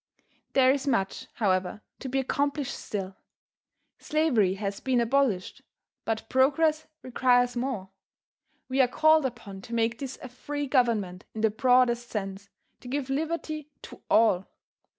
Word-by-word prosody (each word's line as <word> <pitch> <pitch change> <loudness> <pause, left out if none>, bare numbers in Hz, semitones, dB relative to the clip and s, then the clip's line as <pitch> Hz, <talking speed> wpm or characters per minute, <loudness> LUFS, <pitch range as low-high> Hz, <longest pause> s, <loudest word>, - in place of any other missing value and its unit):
There 260 -1 +5
is 280 0 -1
much, 195 -8 -1
however, 190 0 0 0.2
to 265 - -6
be 265 - -1
accomplished 280 +1 -1
still. 190 -2 -5 0.8
Slavery 250 -12 +2
has 200 0 -4
been 260 -2 +1
abolished, 235 -6 0 0.4
but 225 -1 -2
Progress 305 +4 +2 0.2
requires 245 -1 +2
more. 240 -7 -3 0.8
We 265 +1 +2
are 255 - +4
called 310 +2 +4
upon 210 -6 -10
to 235 +4 -6
make 230 0 0
this 270 -2 -6
a - - -5
free 290 +4 -5
government 225 -9 0
in 220 - -3
the 220 -1 +3
broadest 245 0 +3
sense, 195 -1 -5 0.3
to 250 - -12
give 270 +1 -3
liberty 310 0 -3
to - - -11
all. 205 -5 +4
245 Hz, 140 wpm, -27 LUFS, 215-275 Hz, 0.8 s, There